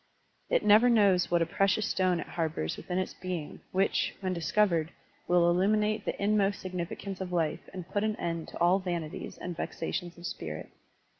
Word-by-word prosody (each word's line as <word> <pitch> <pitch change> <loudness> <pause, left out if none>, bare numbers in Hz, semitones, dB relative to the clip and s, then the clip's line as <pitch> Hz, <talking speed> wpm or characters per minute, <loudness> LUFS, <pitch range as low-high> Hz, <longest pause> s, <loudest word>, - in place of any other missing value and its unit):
It - - +2
never 215 +4 +7
knows 200 -6 +4
what 170 -1 +3
a - - -1
precious 195 +5 +1
stone 185 -2 +1
it - - -4
harbors 160 - -2
within 180 - -4
its 185 - -1
being, 180 -5 -5
which, 195 +1 +1
when 185 -2 -1
discov 185 +5 +2
ered, 165 -2 0 0.4
will 175 -1 +4
illuminate 210 +4 +2
the - - -3
inmost 200 -1 +2
significance 185 +1 -5
of 185 -1 -4
life 165 -3 -1
and 185 -3 -7
put 205 +2 -1
an 215 -1 0
end 165 -4 -3
to - - -9
all 175 +3 +4
vanities 170 -4 -4
and 180 -1 -5
vexations 175 +1 -4
of 175 - -10
spirit. 185 - -5
185 Hz, 180 wpm, -30 LUFS, 170-200 Hz, 0.4 s, never